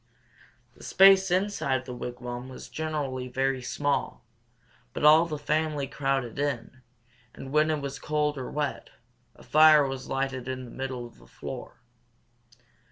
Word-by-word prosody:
The -, -, -17 dB
space 190 Hz, 0 st, +6 dB
inside 180 Hz, -9 st, 0 dB
the 125 Hz, -, -7 dB
wigwam 125 Hz, +1 st, -6 dB
was 130 Hz, -, -10 dB
generally 145 Hz, -5 st, -3 dB
very 130 Hz, +1 st, -1 dB
small; 145 Hz, +3 st, -2 dB, 0.7 s
but -, -, -5 dB
all 155 Hz, +3 st, +7 dB
the 155 Hz, -2 st, -4 dB
family 150 Hz, -1 st, -1 dB
crowded 135 Hz, -3 st, -2 dB
in, 130 Hz, -2 st, -3 dB, 0.5 s
and 135 Hz, -, -9 dB
when 155 Hz, +1 st, +3 dB
it 155 Hz, -2 st, 0 dB
was 140 Hz, 0 st, -5 dB
cold 150 Hz, -1 st, 0 dB
or 130 Hz, -2 st, -5 dB
wet, 150 Hz, -2 st, -3 dB, 0.5 s
a -, -, -16 dB
fire 155 Hz, -1 st, +6 dB
was 135 Hz, -1 st, -6 dB
lighted 135 Hz, -1 st, -2 dB
in 130 Hz, -1 st, -4 dB
the 120 Hz, -, -12 dB
middle 130 Hz, -2 st, -5 dB
of 120 Hz, -, -15 dB
the -, -, -18 dB
floor. -, -, -9 dB
135 Hz, 150 wpm, -27 LUFS, 130-150 Hz, 0.7 s, all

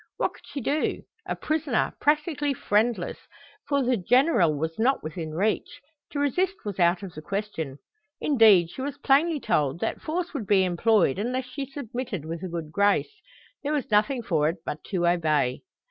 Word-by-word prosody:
What -, -, 0 dB
could -, -, -18 dB
she 280 Hz, -, -5 dB
do? 295 Hz, +6 st, -1 dB, 0.2 s
A -, -, -1 dB
prisoner, 310 Hz, -6 st, -1 dB
practically 295 Hz, -1 st, +1 dB
friendless, 210 Hz, -4 st, 0 dB, 0.5 s
for 280 Hz, -2 st, +2 dB
the 250 Hz, -1 st, +2 dB
General 235 Hz, -, +3 dB
was 160 Hz, +5 st, -3 dB
not 260 Hz, +4 st, +2 dB
within 155 Hz, 0 st, -5 dB
reach, 215 Hz, -, -1 dB, 0.3 s
to -, -, -6 dB
resist 360 Hz, +7 st, +1 dB
was 200 Hz, -2 st, -5 dB
out 175 Hz, +2 st, +3 dB
of 185 Hz, -3 st, -7 dB
the 155 Hz, -, -8 dB
question. 180 Hz, -7 st, -4 dB, 0.4 s
Indeed, 215 Hz, -, +5 dB
she -, -, -7 dB
was 285 Hz, +1 st, -4 dB
plainly 295 Hz, +3 st, +3 dB
told 150 Hz, -, 0 dB
that 225 Hz, -, -2 dB
force 340 Hz, +2 st, -3 dB
would 230 Hz, -9 st, -4 dB
be 195 Hz, -2 st, +4 dB
employed 185 Hz, -, +2 dB
unless 250 Hz, +4 st, -1 dB
she 270 Hz, +2 st, -6 dB
submitted 245 Hz, -, -5 dB
with 165 Hz, +1 st, -5 dB
a 190 Hz, -, -4 dB
good 165 Hz, -3 st, -5 dB
grace. 205 Hz, -, +1 dB, 0.4 s
There 295 Hz, +1 st, -2 dB
was 285 Hz, -6 st, -2 dB
nothing 215 Hz, +4 st, +2 dB
for 155 Hz, -7 st, +2 dB
it 165 Hz, 0 st, -6 dB
but 150 Hz, -, -5 dB
to 180 Hz, -4 st, -1 dB
obey. 155 Hz, -7 st, +1 dB
215 Hz, 175 wpm, -26 LUFS, 170-280 Hz, 0.5 s, Indeed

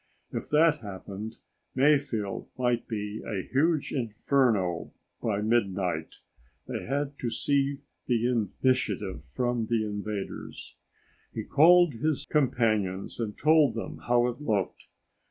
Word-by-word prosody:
If -, -, -5 dB
that 155 Hz, +1 st, +4 dB
happened, 105 Hz, +1 st, -7 dB, 0.4 s
Mayfield 135 Hz, -7 st, +1 dB
might 125 Hz, -2 st, 0 dB
be 105 Hz, -1 st, -4 dB
a 95 Hz, -4 st, -3 dB
huge 155 Hz, +2 st, +1 dB
inferno 110 Hz, -, +1 dB, 0.3 s
by 105 Hz, -2 st, 0 dB
midnight. 95 Hz, -7 st, 0 dB, 0.5 s
They -, -, -4 dB
had 140 Hz, +1 st, -2 dB
to 120 Hz, -, -1 dB
seize 140 Hz, +4 st, +1 dB, 0.3 s
the 120 Hz, -2 st, +2 dB
initiative 115 Hz, -, 0 dB
from 120 Hz, -, -1 dB
the 115 Hz, -2 st, +1 dB
invaders. 105 Hz, -1 st, -5 dB, 0.6 s
He -, -, -2 dB
called 175 Hz, +1 st, +6 dB
his 145 Hz, +4 st, -1 dB
companions 110 Hz, -11 st, 0 dB
and 110 Hz, -3 st, -3 dB
told 150 Hz, -5 st, +4 dB
them 115 Hz, -, -5 dB
how 120 Hz, 0 st, +4 dB
it 125 Hz, +2 st, -3 dB
looked. 105 Hz, -9 st, -1 dB
120 Hz, 120 wpm, -28 LUFS, 105-140 Hz, 0.6 s, called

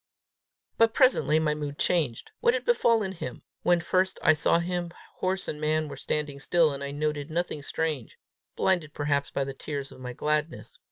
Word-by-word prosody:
But 230 Hz, 0 st, +4 dB
presently 155 Hz, -, +4 dB
my 155 Hz, -1 st, +2 dB
mood 145 Hz, -1 st, -5 dB
changed: 155 Hz, -, 0 dB
what 470 Hz, 0 st, +3 dB
had 480 Hz, -, -3 dB
befallen 230 Hz, -, +3 dB
him? 165 Hz, -9 st, -7 dB, 0.2 s
When 175 Hz, -1 st, +3 dB
first 185 Hz, +2 st, +1 dB
I 160 Hz, -, +7 dB
saw 155 Hz, -, +3 dB
him, 175 Hz, 0 st, -2 dB, 0.3 s
horse 190 Hz, +1 st, -1 dB
and 150 Hz, -, -4 dB
man 155 Hz, 0 st, +1 dB
were -, -, -6 dB
standing 150 Hz, -2 st, -2 dB
still, 165 Hz, +2 st, +3 dB
and 140 Hz, 0 st, -5 dB
I 140 Hz, -, -3 dB
noted 145 Hz, 0 st, -2 dB
nothing 165 Hz, -2 st, -2 dB
strange, 150 Hz, -4 st, -3 dB, 0.4 s
blinded 170 Hz, -6 st, +1 dB
perhaps 145 Hz, -1 st, 0 dB
by 140 Hz, -, -1 dB
the 135 Hz, 0 st, -5 dB
tears 140 Hz, 0 st, -5 dB
of -, -, -13 dB
my 125 Hz, -1 st, -6 dB
gladness. 150 Hz, +4 st, -2 dB
155 Hz, 180 wpm, -27 LUFS, 145-180 Hz, 0.4 s, I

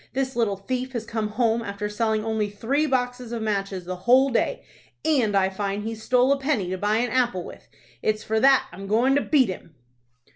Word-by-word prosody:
This 265 Hz, 0 st, -2 dB
little 220 Hz, -5 st, 0 dB
thief 255 Hz, +6 st, -4 dB
has 230 Hz, -2 st, -3 dB
come 220 Hz, -1 st, -2 dB
home, 225 Hz, +1 st, +1 dB
after 205 Hz, -1 st, -4 dB
selling 215 Hz, 0 st, -1 dB
only 220 Hz, -2 st, -1 dB
three 260 Hz, +9 st, 0 dB
boxes 250 Hz, -2 st, -2 dB
of 230 Hz, -2 st, -3 dB
matches 195 Hz, -3 st, -2 dB
the 180 Hz, 0 st, -5 dB
whole 265 Hz, +2 st, +5 dB
day, 235 Hz, -, 0 dB, 0.4 s
and 250 Hz, -10 st, +2 dB
I 190 Hz, -1 st, +3 dB
find 200 Hz, +1 st, -3 dB
he's 225 Hz, 0 st, -5 dB
stole 250 Hz, +3 st, +3 dB
a 280 Hz, -, +2 dB
penny 260 Hz, -10 st, -1 dB
to 185 Hz, -, -2 dB
buy 210 Hz, +2 st, +1 dB
an 240 Hz, +1 st, 0 dB
apple 245 Hz, -8 st, +1 dB
with. -, -, -12 dB, 0.3 s
It's 215 Hz, 0 st, 0 dB
for 220 Hz, 0 st, 0 dB
that 270 Hz, +3 st, +5 dB
I'm 195 Hz, +3 st, -9 dB
goin' 235 Hz, +6 st, +3 dB
to 285 Hz, -, +3 dB
beat 270 Hz, -8 st, +3 dB
him." 170 Hz, -4 st, -8 dB
225 Hz, 210 wpm, -24 LUFS, 205-255 Hz, 0.4 s, whole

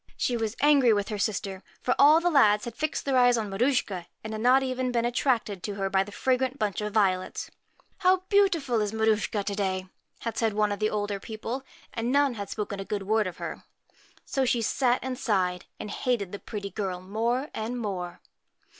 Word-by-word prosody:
She 245 Hz, -, 0 dB
was 225 Hz, -1 st, -2 dB
angry 285 Hz, -5 st, +5 dB
with 205 Hz, 0 st, -1 dB
her 210 Hz, -2 st, -3 dB
sister; 195 Hz, -2 st, -2 dB, 0.2 s
for 250 Hz, -, +1 dB
all 300 Hz, +3 st, +8 dB
the 350 Hz, +1 st, +1 dB
lads 210 Hz, -7 st, +5 dB
had 235 Hz, -, -5 dB
fixed 310 Hz, +4 st, -2 dB
their 270 Hz, -2 st, +3 dB
eyes 245 Hz, -1 st, +5 dB
on 215 Hz, -3 st, -3 dB
Maruschka, 200 Hz, -5 st, 0 dB, 0.2 s
and 220 Hz, 0 st, -5 dB
had 215 Hz, -, -4 dB
not 255 Hz, +3 st, +5 dB
even 255 Hz, -1 st, -1 dB
been 235 Hz, -1 st, +1 dB
attracted 240 Hz, -5 st, 0 dB
to 205 Hz, +1 st, -4 dB
her 195 Hz, -1 st, -2 dB
by 190 Hz, 0 st, +3 dB
the 205 Hz, -, -11 dB
fragrant 260 Hz, +4 st, 0 dB
bunch 210 Hz, -5 st, -1 dB
of 210 Hz, 0 st, -3 dB
violets. 190 Hz, -3 st, 0 dB, 0.2 s
' -, -, -36 dB
How 370 Hz, -1 st, +3 dB
beautiful 335 Hz, -, +3 dB
is 210 Hz, 0 st, -1 dB
Maruschka 220 Hz, -1 st, +1 dB
PRETTY 200 Hz, -, -3 dB
to -, -, -3 dB
day 190 Hz, -2 st, -1 dB, 0.2 s
!' -, -, -41 dB
had 230 Hz, -, -3 dB
said 225 Hz, -2 st, +1 dB
some 210 Hz, 0 st, +1 dB
of 205 Hz, -, -3 dB
the 215 Hz, 0 st, +2 dB
older 205 Hz, -1 st, -2 dB
people; 225 Hz, +5 st, -5 dB, 0.3 s
and 235 Hz, +1 st, -1 dB
none 280 Hz, -1 st, +3 dB
had 200 Hz, -3 st, -6 dB
spoken 205 Hz, -2 st, -4 dB
a -, -, -3 dB
good 200 Hz, 0 st, -3 dB
word 215 Hz, +1 st, +1 dB
of 180 Hz, -, -7 dB
her. -, -, -6 dB, 0.6 s
So 270 Hz, -, -1 dB
sne 240 Hz, -2 st, +1 dB
sat 250 Hz, +2 st, +2 dB
and 260 Hz, -1 st, -4 dB
sighed, 185 Hz, -7 st, 0 dB
and 210 Hz, -, -6 dB
hated 225 Hz, -7 st, -1 dB
the 200 Hz, -, -6 dB
pretty 200 Hz, -3 st, -6 dB
girl 190 Hz, -2 st, -3 dB
more 230 Hz, +8 st, -1 dB
and 225 Hz, +3 st, -3 dB
more. 185 Hz, -6 st, -4 dB
220 Hz, 215 wpm, -27 LUFS, 200-255 Hz, 0.6 s, all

